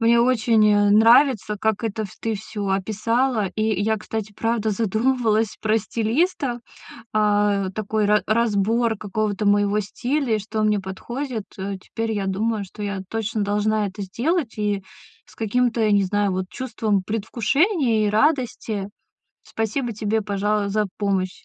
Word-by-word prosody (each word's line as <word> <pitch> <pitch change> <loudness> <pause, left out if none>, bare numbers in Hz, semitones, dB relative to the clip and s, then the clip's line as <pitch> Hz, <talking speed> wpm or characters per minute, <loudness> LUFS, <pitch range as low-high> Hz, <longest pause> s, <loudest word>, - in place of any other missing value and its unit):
мне 230 +1 +4
очень, 230 -3 +3
э, 205 -1 +4
нравится, 225 0 +5
как 220 +2 -1
это 220 0 -2
вс 195 - -11
ты 225 -1 -2
всё 205 0 -5
описала. 215 +4 0
И 215 - -1 0.2
я, 220 +1 +1
кстати, 215 0 -5
правда 225 0 -1
задумывалась 225 +1 +1
про 220 +1 +2
стилиста, 240 - -1 0.6
а, 205 -2 +2
такой 215 +1 -1
ра 210 +1 +3
разбор 225 +1 +2
какого-то 205 0 -2
моего 205 0 +3
стиля, 245 +4 -1
и - - -1
что 215 +1 -3
мне 210 -1 +2
подходит. 225 +5 -5
Э, 195 0 -4
теперь 225 +3 -4
я 200 -2 -2
думаю, 210 +2 -1
что 200 +2 -9
я 200 -1 -3
точно 225 -1 -2
должна 210 +1 +1
это 200 +2 -6
сделать, 245 - -1
и 205 -2 -1 0.4
с - - -19
каким-то, 225 0 +1
не 200 -1 +4
знаю, 205 +1 0
вот 185 0 -2
чувством 220 -3 -1
предвкушения 225 - +1
и - - +1
радости. 230 -6 0 0.5
Спасибо 225 +3 -2
тебе, 215 +1 -1
пожа 205 0 0
за 210 0 +1
помощь. 190 -3 -2
215 Hz, 150 wpm, -22 LUFS, 205-230 Hz, 0.6 s, нравится